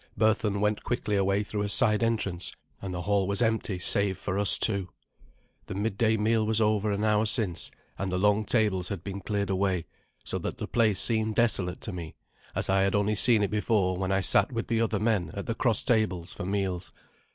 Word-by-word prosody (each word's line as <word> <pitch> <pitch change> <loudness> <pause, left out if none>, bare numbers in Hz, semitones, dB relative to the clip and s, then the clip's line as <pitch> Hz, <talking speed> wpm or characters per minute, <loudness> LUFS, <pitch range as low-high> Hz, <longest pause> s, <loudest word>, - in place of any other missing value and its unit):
Berthun 110 -1 +1
went 105 0 0
quickly 115 -4 -2
away 100 +1 +1
through 105 0 -4
a 105 - -2
side 105 +1 +3
entrance, 105 -6 -2 0.3
and 95 - -5
the 90 -1 -4
hail 100 0 +1
was 100 0 -1
empty 110 -4 0
save 95 +1 +2
for 95 +1 -3
us 100 - +7
two. 100 -4 -1 0.8
The - - -6
midday 110 +2 0
meal 110 +1 +1
was 110 0 +1
over 105 -1 +1
an 100 +1 -2
hour 105 0 +2
since, 105 -6 -1 0.3
and 95 -1 -2
the 90 - -1
long 105 +2 +2
tables 105 -5 0
had 95 -5 -5
been 100 0 -6
cleared 100 0 -2
away, 95 -2 0 0.4
so - - -2
that - - -5
the - - -5
place 110 -4 +2
seemed 110 -2 +2
desolate 95 -6 +1
to 110 - -6
me, 85 -3 -8 0.4
as - - 0
I 95 0 +2
had 95 0 +1
only 105 +1 +1
seen 110 +1 +5
it 100 - -1
before 105 -3 +1
when 95 +1 -2
I 95 0 +1
sat 100 +3 +2
with 115 -1 -4
the 115 -1 +1
other 110 -2 0
men 105 -6 0
at 100 - -5
the 115 - -2
cross 115 -2 0
tables 105 -8 0
for 90 - -6
meals. 95 -2 -2
105 Hz, 210 wpm, -27 LUFS, 95-110 Hz, 0.8 s, us